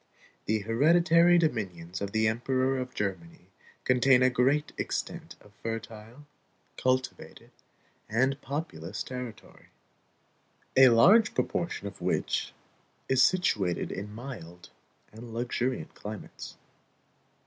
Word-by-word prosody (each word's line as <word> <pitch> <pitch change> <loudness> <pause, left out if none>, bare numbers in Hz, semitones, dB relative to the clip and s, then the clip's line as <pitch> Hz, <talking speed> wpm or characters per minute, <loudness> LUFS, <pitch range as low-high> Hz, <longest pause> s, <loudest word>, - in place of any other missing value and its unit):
The 110 0 0
hereditary 170 - +4
dominions 95 - -2
of 100 0 -3
the 110 +1 +2
Emperor 130 +3 0
of 125 0 -6
Germany 95 -2 -5 0.3
contain 125 0 +4
a 130 - +4
great 135 +5 +1
extent - - -4
of 105 - -19
fertile, 115 +3 -7 0.5
cultivated, 130 0 -2 0.6
and 130 +5 +1
populous 105 - -5
territory, 125 -3 -9 1.1
a 130 -1 +8
large 195 - +5
proportion 170 -11 -2
of 100 -1 -8
which - - -1 0.6
is 130 -1 +3
situated 105 - +1
in 100 +2 -6
mild 105 -8 -9 0.4
and 115 +1 -10
luxuriant 125 +1 -2
climates. 105 0 -9
120 Hz, 105 wpm, -28 LUFS, 105-135 Hz, 1.1 s, a